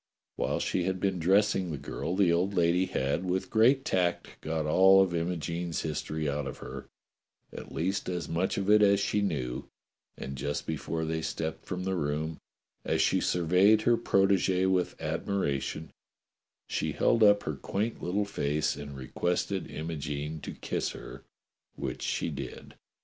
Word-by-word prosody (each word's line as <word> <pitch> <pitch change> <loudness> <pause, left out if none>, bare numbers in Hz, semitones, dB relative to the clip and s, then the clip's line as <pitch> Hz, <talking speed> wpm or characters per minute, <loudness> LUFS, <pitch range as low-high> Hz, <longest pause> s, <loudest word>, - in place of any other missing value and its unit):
\\Tiile - - 0
she 90 - 0
had 95 0 -1
been 95 -1 0
dressing 95 +1 +3
the 75 - -3
girl 90 - -4
the 95 -3 +4
old 95 +4 +1
lady 90 +2 +3
had 70 +4 -1
with 95 0 -2
great 125 +5 +4
tact 90 -2 -1
got 80 -1 -2
all 95 +5 +6
of 95 -2 +3
Imogene's 85 0 -2
history 75 0 -3
out 70 -1 -2
of 65 - -6
her, - - -8 0.6
at - - -8
least 95 +4 -1
as 90 -2 -3
much 85 +3 -1
of 100 - -1
it 105 +1 +6
as 100 -1 +5
she 105 +1 +1
knew, 65 -11 -2 0.5
and 70 0 -6
just 70 +2 -2
before 80 -1 -3
they 80 0 -2
stepped 80 0 -4
from 90 -1 -3
the 95 0 -1
room, 80 -1 -2 0.4
as - - 0
she - - +3
surveyed 90 +5 +4
her 120 - +4
protegee 95 -4 +2
with 95 -1 0
admiration, 80 -5 -2 0.7
she - - -2
held 115 - +2
up 105 -1 +6
her - - -2
little 105 -2 -1
quaint - - -7
face 75 -5 0
and 70 -1 -8
requested 90 +8 -2
Imogene 75 -1 -4
to - - -6
kiss - - -3
her, - - -10 0.5
which - - -4
she - - -1
did. - - -7
90 Hz, 160 wpm, -29 LUFS, 80-95 Hz, 0.7 s, all